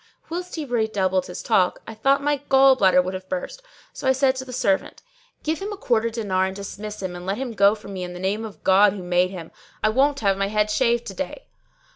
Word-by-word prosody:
Whilst 360 +2 -4
he 315 -3 -4
redoubled 205 -7 0
his 180 - -7
talk, 190 -6 +1
I 225 - -8
thought 275 +6 +2
my 290 0 +1
gall 270 0 +6
bladder 185 -6 +4
would 185 +1 -4
have 185 0 -7
burst; 185 - -4 0.3
so - - -5
I 265 - +5
said 265 0 +2
to 260 - -5
the 255 - -9
servant, 195 -5 -1 0.4
"Give 315 +1 -1
him 405 +2 -4
a 410 - -6
quarter 230 - +1
dinar 200 -5 0
and 190 - -6
dismiss 205 +1 -7
him 180 -1 -4
and 175 - -8
let 195 +2 -1
him 260 -1 -4
go 200 0 +4
from 205 -2 -10
me 185 - -5
in 180 0 -5
the 180 - -8
name 200 +4 -1
of 220 -2 -9
God 195 +1 +5
who 195 -3 -7
made 180 +1 +2
him. 175 -4 -9 0.3
I 215 - +4
won't 275 +4 +2
have 195 -2 +2
my 195 - +1
head 210 0 +1
shaved 235 +1 +1
to 195 - -6
day." 285 - -6
210 Hz, 245 wpm, -23 LUFS, 190-260 Hz, 0.4 s, gall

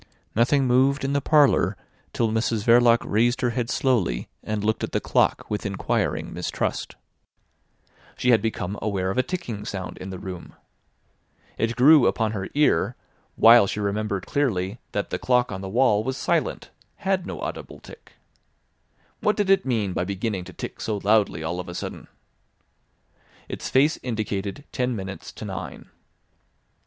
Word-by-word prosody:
Nothing 130 +5 +3
moved 130 +3 +3
in 135 - -1
the 140 - +1
parlour 150 -1 +3 0.3
till 115 -2 0
Mrs 110 -1 0
Verloc 120 0 +5
raised 120 +4 +1
her 120 -2 +1
head 115 0 -2
slowly 105 - 0
and 105 -1 -3
looked 110 +1 0
at - - -4
the - - +2
clock - - +1
with 105 - -3
inquiring 100 -1 -2
mistrust. - - -3 1.2
She 125 - +2
had 115 - +5
become 105 -3 -3
aware 95 -3 -1
of 110 - -1
a - - +6
ticking 125 - -5
sound 95 -4 -6
in 95 - -7
the 95 - -6
room. 90 -1 -8 1.0
It 115 +1 -1
grew 140 +3 +7
upon 110 -2 0
her 100 -3 -4
ear, 145 - +2 0.4
while 115 -2 +7
she 105 - -3
remembered 100 -1 -2
clearly 110 -7 -1
that 100 - -3
the - - -2
clock 125 -1 +2
on 95 -1 -5
the 95 - -5
wall 110 -1 +3
was 130 +2 -3
silent, - - -1 0.2
had 190 -1 -1
no - - -6
audible - - -6
tick. - - -15 1.1
What 210 - +1
did 205 -2 +2
it 195 -8 +3
mean 105 -7 0
by 90 - -1
beginning 95 0 -3
to 95 - -11
tick - - -7
so 110 -2 -2
loudly 100 -5 +2
all 85 +3 -3
of 90 0 -6
a 90 - -7
sudden? - - -6 1.4
Its - - -5
face 140 +4 +3
indicated 105 0 -3
ten 125 -1 -1
minutes 95 -1 -7
to - - -8
nine. - - -7
110 Hz, 165 wpm, -24 LUFS, 100-125 Hz, 1.4 s, grew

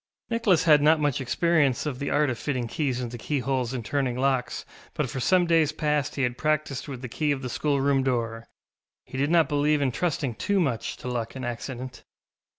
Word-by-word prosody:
Nicholas 230 -7 +3
had 150 -3 +6
not 150 +2 +6
had - - -5
much 145 -2 +1
experience 140 +1 +2
of 135 -4 -3
the 140 - -2
art 145 -2 +2
of 120 - -5
fitting 130 -5 -2
keys 130 0 -1
into 120 -1 -5
keyholes 130 -2 -1
and 125 -4 -4
turning 135 -3 -1
locks, 130 -2 0 0.3
but - - 0
for 130 - -4
some 180 +8 +3
days 165 -3 +3
past 150 -2 -1
he 140 - 0
had 125 0 -1
practised 155 -3 -1
with 135 -3 -7
the - - -3
key 150 +5 -1
of 135 -1 -2
the 125 - -3
schoolroom 140 0 +1
door; 115 -3 -2 0.6
he - - -11
did 145 +2 +1
not 165 -3 +4
believe 150 0 +2
in 140 -2 +1
trusting 145 -3 -1
too 200 - 0
much 130 -10 -1
to - - -8
luck 120 -1 -3
and 130 -1 -5
accident. 125 +1 -6
135 Hz, 210 wpm, -26 LUFS, 125-150 Hz, 0.6 s, had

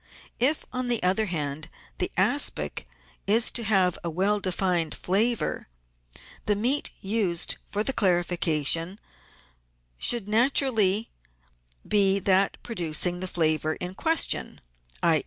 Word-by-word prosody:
If, 280 +6 +2
on 255 0 -3
the 240 -4 +2
other 195 +4 +1
hand, 155 -3 -4 0.3
the - - +1
aspic 65 - 0 0.4
is 225 +4 +5
to 235 - -5
have 190 -4 +1
a 170 - -3
well 195 +5 0
defined 180 -3 -1
flavour, 220 +6 0 0.8
the 210 - +1
meat 250 +8 +2
used 195 -4 -1
for 210 +1 -2
the 270 - -2
clarification 175 - +1 1.0
should 235 -5 +2
naturally 225 -3 +2 0.8
be 195 -2 +2
that 195 0 +1
producing 175 -4 -1
the 185 - -3
flavour 155 -2 -1
in 180 0 -5
question, 325 +10 0 0.4
i. - - +3
195 Hz, 120 wpm, -25 LUFS, 175-225 Hz, 1.0 s, is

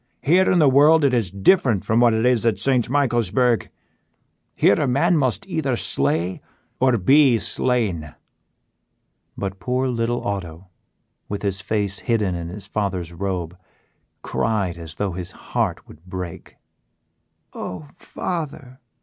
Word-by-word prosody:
Here 180 +6 +4
in 185 - +3
the 155 -4 +5
world 145 +3 +5
it 135 - +2
is 115 -7 +1
different 105 - +2
from 110 +2 +2
what 120 -2 +4
it 110 +2 0
is 125 -4 +3
at 115 -5 +1
St. 125 +3 +1
Michaelsburg; 120 -3 +1 0.9
here 100 - +3
a 145 - +1
man 155 +8 +2
must 130 - +1
either - - -1
slay 85 +6 0 0.4
or 130 -2 +3
be 130 +5 +5
slain." 105 - -1 1.2
But 95 -1 -4
poor 125 +7 -1
little 120 0 -2
Otto, 90 -3 -5 0.6
with 100 0 -4
his 95 -1 -1
face 100 -1 -2
hidden 110 -6 0
in 85 -1 -5
his 100 +2 -8
father's 95 -5 -3
robe, 90 -2 -4 0.7
cried 100 -6 -1
as 80 -2 -9
though 100 +2 -2
his 90 0 -6 0.2
heart - - -1
would 80 - -16
break. 90 -2 -7 1.0
"Oh, 90 +11 -7
father!" 145 -6 -6
110 Hz, 140 wpm, -22 LUFS, 95-130 Hz, 1.2 s, the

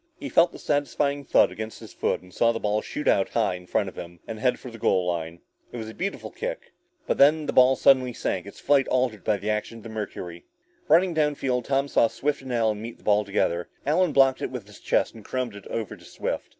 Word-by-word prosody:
He 285 - -5
felt 170 +1 +4
the - - -10
satisfying 145 -1 0
thud - - +4
against 110 0 -7
his - - -12
foot, - - -1
and 90 0 -17
saw 115 - +3
the 115 - -3
ball 105 0 0
shoot 150 - -5
out 95 - +3
high 115 -5 +1
in 90 0 -9
front 100 - 0
of 95 - -9
him 85 0 -9
and 110 -1 -6
head 125 +1 +2
for 125 - -9
the 115 - -11
goal 95 -3 +2
line. 85 -1 -3 0.3
It - - -7
was 110 -1 -6
a - - -13
beautiful 195 - -4
kick. - - -5 0.3
But - - -1
then, 150 +2 +5
the - - -2
ball 130 +1 +6
suddenly 130 -1 +4
sank, 95 -5 -3
its 100 - -11
flight 140 -2 +3
altered 125 -6 0
by 105 -2 +1
the 105 +2 -2
action 105 +2 -3
of 110 - -13
the 115 - -8
mercury. 90 -5 -6 0.4
Running 175 +2 +4
down 150 -2 +1
field, 125 -3 -1
Tom 140 0 +1
saw 115 - +3
Swift 145 +5 -2
and 130 -1 -7
Allen 110 -3 +1
meet 115 +1 -7
the - - -24
ball 105 0 +3
together. 90 -4 -1 0.2
Allen 165 +3 +2
blocked 135 -2 +4
it - - -2
with 125 -5 -6
his 105 0 -15
chest - - +1
and 110 - -12
caromed 125 0 -3
it 100 - -11
over 110 -3 -4
to - - -18
Swift. - - -4
115 Hz, 250 wpm, -25 LUFS, 105-140 Hz, 0.4 s, ball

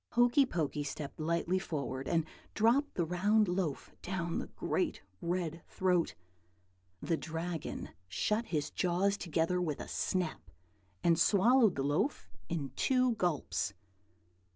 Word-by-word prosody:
Hokey 245 +3 +5
Pokey 150 - -1
stepped 145 +1 -6
lightly 170 +3 +1
forward, 135 -6 -4
and 165 -2 +2 0.3
dropped 240 +7 +3
the 170 - +1
round 205 +5 +3
loaf 175 -5 -2
down 175 -2 -2
the - - -4
great - - -2 0.2
red 170 -2 -2
throat. 180 -3 +1 0.9
The 165 - +1
Dragon 165 0 -4 0.2
shut 210 - 0
his 150 -4 -1
jaws 185 +2 +1
together 175 0 0
with 155 -5 -2
a - - -6
snap, 180 - -2 0.5
and 170 -1 +4
swallowed 220 0 +5
the 135 - -1
loaf 150 - 0 0.2
in 155 -5 -2
two 255 -2 +3
gulps. 100 - -1
175 Hz, 130 wpm, -33 LUFS, 155-200 Hz, 0.9 s, Hokey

